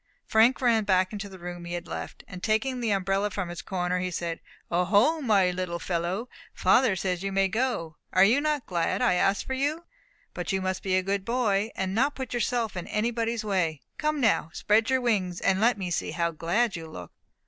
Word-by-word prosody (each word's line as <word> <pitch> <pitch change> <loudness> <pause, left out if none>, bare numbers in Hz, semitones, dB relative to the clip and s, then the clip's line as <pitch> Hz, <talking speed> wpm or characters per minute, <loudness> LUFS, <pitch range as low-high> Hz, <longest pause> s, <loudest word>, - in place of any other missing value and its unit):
Frank 230 +5 +4
ran 230 -3 +3
back 185 -2 +2
to 200 0 -6
the 190 - -11
room 175 0 -7
he 175 - -5
had 175 0 -4
left, - - -6
and 180 -1 -9
taking 225 +5 0
the 235 -2 -1
umbrella 195 +1 +1
from 190 -3 -4
its 175 - -6
corner, 180 -1 -1
he 185 0 -2
said, 170 -2 -3 0.3
"O 175 +1 +2
ho, 225 - +3
my 200 -8 +3
little 180 -1 -3
fellow, 175 +6 -2 0.3
father 255 -7 +4
says 180 -2 -2
you 195 0 -2
may 195 0 +2
go. 190 -8 -2
Are 185 - +5
you 235 +8 +4
not 300 -3 0
glad 175 +7 0
I 240 - +4
asked 195 +2 +1
for 265 - -3
you? 295 +5 -1 0.5
But - - -3
you 195 - +1
must 185 0 -2
be 190 -1 0
a 185 - +2
good 195 0 -1
boy, 220 -3 +1
and 190 0 -2
not 275 +7 +1
put 260 -2 -5
yourself 235 -3 -1
in 180 - -5
anybody's 230 +1 -1
way. 170 -8 0 0.2
Come 305 0 0
now, 225 - +2
spread 220 +3 +2
your 260 -1 +2
wings, 190 -7 0
and 195 0 +1
let 235 +1 +4
me 185 -3 -4
see - - -1
how 170 +1 -1
glad 190 +8 0
you 165 -1 -6
look." 90 - -9
195 Hz, 215 wpm, -27 LUFS, 180-235 Hz, 0.5 s, Are